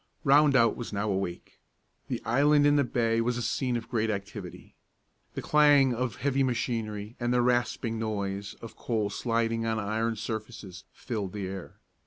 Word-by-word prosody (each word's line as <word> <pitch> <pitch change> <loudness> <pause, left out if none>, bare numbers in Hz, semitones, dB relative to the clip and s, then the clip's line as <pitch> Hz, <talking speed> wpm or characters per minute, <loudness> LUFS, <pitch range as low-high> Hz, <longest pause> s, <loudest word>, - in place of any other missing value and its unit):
Rondout 135 -5 +5
was 120 - -6
now 105 0 -1
awake. 95 -2 -4 0.5
The - - -4
island 145 +4 +4
in 145 0 +5
the 145 - +4
bay 115 -2 +1
was 120 +1 0
a 120 - -3
scene 125 +1 -1
of 115 - -7
great 110 -2 0
activity. 100 -2 -6 0.6
The - - -4
clang 145 -3 +5
of 120 -3 -2
heavy 135 0 0
machinery 115 -4 -2
and 120 0 -1
the 125 -1 +3
rasping 120 -2 0
noise 100 -2 -3
of 115 - -9
coal 110 -4 -2
sliding 115 0 -1
on 110 0 0
iron 110 +2 -1
surfaces 110 -4 -6
filled 105 -7 -5
the 100 -2 -4
air. 95 -1 -7
115 Hz, 165 wpm, -28 LUFS, 105-125 Hz, 0.6 s, Rondout